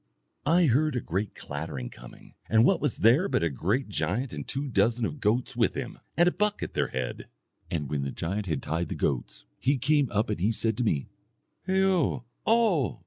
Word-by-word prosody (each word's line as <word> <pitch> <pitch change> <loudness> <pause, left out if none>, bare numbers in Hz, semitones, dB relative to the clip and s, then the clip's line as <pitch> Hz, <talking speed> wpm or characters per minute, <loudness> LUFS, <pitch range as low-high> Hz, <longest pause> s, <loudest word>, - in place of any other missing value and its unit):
I 170 +3 +5
heard 150 +2 +2
a - - +1
great 100 -1 -3
clattering, 70 -4 -5
coming, - - -14 0.2
and 110 +1 +5
what 175 +4 +3
was 145 -5 0
there 125 - +5
but - - +1
a 85 - +1
great 100 - 0
giant 100 - -2
and - - -6
two 140 +2 -3
dozen 115 0 +2
of 150 - -4
goats 120 +4 0
with 115 -1 +2
him, 130 -3 -5 0.2
and 175 +1 +5
a - - +4
buck 210 +2 0
at - - -5
their - - +1
head. 65 -1 -4 0.4
And 75 -4 -2
when 70 +1 -2
the 70 - -2
giant 95 +8 -3
had 80 -6 -2
tied 80 +1 -2
the - - -3
goats, - - -2
he 140 +2 +2
came 140 +1 +2
up 110 +1 +1
and 105 - -2
he 100 +6 +2
said 110 0 0
to - - 0
me, 75 - +1 0.6
'Hao 190 -9 +2 0.2
O! 215 - +3
115 Hz, 205 wpm, -28 LUFS, -, 0.6 s, I